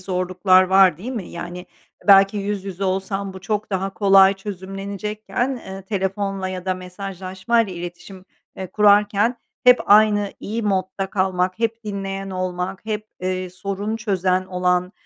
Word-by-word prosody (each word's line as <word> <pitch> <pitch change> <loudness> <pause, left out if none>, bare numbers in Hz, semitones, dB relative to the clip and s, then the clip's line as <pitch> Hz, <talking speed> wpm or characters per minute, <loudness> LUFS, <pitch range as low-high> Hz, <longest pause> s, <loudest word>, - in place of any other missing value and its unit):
zorluklar 185 0 +3
var 190 -2 +5
değil 215 +10 -7
mi? 225 -8 -5
Yani, 175 +1 -7 0.4
belki 195 +1 +7
yüz 200 -1 -3
yüze 195 0 -4
olsan 195 +1 -2
bu 190 - -9
çok 210 +2 -3
daha 195 0 -2
kolay 195 -1 +6
çözümlenecekken, 200 +5 -4
eee, 195 -4 -9
telefonla 195 0 -2
ya 185 -1 -6
da 185 -1 0
mesajlaşmayla 190 +3 -2
iletişim, 175 +2 -9 0.3
eee, 190 - -5
kurarken 210 +3 +3 0.3
hep 250 0 +7
aynı 205 -1 +5
iyi 225 +3 -3
modda 195 -1 -1
kalmak, 185 -1 0
hep 230 0 -2
dinleyen 195 -1 -4
olmak, 185 +1 -4
hep, 215 -1 -3
eee, 185 0 -2
sorun 200 +4 -4
çözen 185 -4 0
olan, 180 0 0
195 Hz, 140 wpm, -21 LUFS, 185-205 Hz, 0.4 s, belki